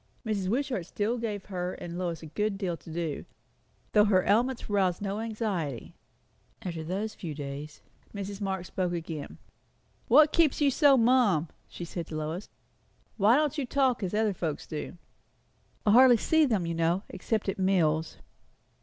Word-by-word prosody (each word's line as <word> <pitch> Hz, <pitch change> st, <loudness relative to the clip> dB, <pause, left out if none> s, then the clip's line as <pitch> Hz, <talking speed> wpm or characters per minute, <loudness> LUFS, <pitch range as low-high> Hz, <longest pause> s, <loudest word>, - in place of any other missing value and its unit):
Mrs. 205 Hz, -4 st, -1 dB
Wishart 245 Hz, -, -1 dB
still 220 Hz, +5 st, -1 dB
gave 210 Hz, -4 st, -4 dB
her 180 Hz, -2 st, -4 dB
and 170 Hz, -1 st, -7 dB
Lois 175 Hz, -3 st, -3 dB
a -, -, -7 dB
good 205 Hz, +6 st, -2 dB
deal 185 Hz, -4 st, -2 dB
to 165 Hz, -, -12 dB
do, 165 Hz, -2 st, -3 dB, 0.7 s
though 210 Hz, -1 st, +5 dB
her 190 Hz, -3 st, +3 dB
ailments 240 Hz, +5 st, +1 dB
aroused 190 Hz, -4 st, +1 dB
no 200 Hz, +1 st, -3 dB
anxiety. 210 Hz, -, -3 dB, 0.7 s
After 170 Hz, -3 st, -4 dB
those 200 Hz, +6 st, -3 dB
few 160 Hz, -5 st, -6 dB
days, 145 Hz, +1 st, -7 dB, 0.3 s
Mrs. 200 Hz, 0 st, -6 dB
Marx 190 Hz, -2 st, -2 dB
spoke 180 Hz, -2 st, -1 dB
again. 160 Hz, -3 st, -5 dB, 0.7 s
"What 300 Hz, +5 st, +6 dB
keeps 325 Hz, -5 st, +3 dB
you 285 Hz, -2 st, +4 dB
so 280 Hz, 0 st, +5 dB
mum?" 225 Hz, -, +3 dB, 0.2 s
she 175 Hz, -, -7 dB
said 170 Hz, -1 st, -5 dB
to 155 Hz, -, -7 dB
Lois. 155 Hz, +5 st, -4 dB, 0.7 s
"Why 215 Hz, +3 st, +5 dB
don't 300 Hz, 0 st, +1 dB
you 275 Hz, -, -1 dB
talk, 265 Hz, -2 st, +1 dB
as 190 Hz, 0 st, -2 dB
other 215 Hz, -1 st, +2 dB
folks 160 Hz, -5 st, -3 dB
do?" 155 Hz, +3 st, -6 dB, 0.9 s
"I 210 Hz, -, +5 dB
hardly 245 Hz, +1 st, +7 dB
see 320 Hz, +7 st, +3 dB
them, 215 Hz, -10 st, 0 dB
you 165 Hz, -, -2 dB
know, 165 Hz, +3 st, +1 dB
except 210 Hz, +3 st, -2 dB
at 195 Hz, -, -2 dB
meals." 165 Hz, -5 st, +1 dB
195 Hz, 165 wpm, -28 LUFS, 170-225 Hz, 0.9 s, hardly